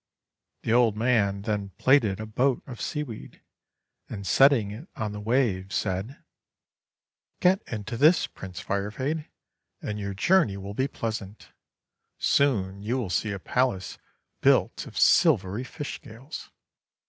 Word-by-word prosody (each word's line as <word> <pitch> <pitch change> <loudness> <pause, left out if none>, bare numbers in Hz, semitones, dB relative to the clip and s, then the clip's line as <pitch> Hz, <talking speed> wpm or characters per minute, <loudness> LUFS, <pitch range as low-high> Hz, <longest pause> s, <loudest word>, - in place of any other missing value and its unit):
The 115 - +1
old 115 -3 +4
man 105 -4 +1
then 100 -3 -3
plaited 120 -8 +3
a 110 - -4
boat 125 +4 0
of 125 -4 -9
sea 150 -2 -2
weed, 115 -7 -10 0.7
and 100 -2 -6
setting 120 0 +4
it 120 - -9
on 110 -2 -3
the 105 - -6
waves, 105 -5 0
said: 100 +6 -3 0.5
— - - -59
"Get 185 +2 +4
into 110 +1 -4
this, 155 +7 +5
Prince 90 -2 -9
Firefade, 130 +11 -2 0.5
and 105 0 -4
your 100 -1 -4
journey 115 - +3
will 100 +1 -7
be 130 +6 0
pleasant. 110 -5 -5 0.7
Soon 100 -9 +1
you 115 +5 -1
will 110 -8 -3
see 105 +5 0
a 100 - -3
palace 110 -1 -1 0.4
built - - +2
of - - -10
silvery 100 +6 +4
fish 145 +2 -6
scales. 120 +7 -10
110 Hz, 140 wpm, -26 LUFS, 100-130 Hz, 0.7 s, this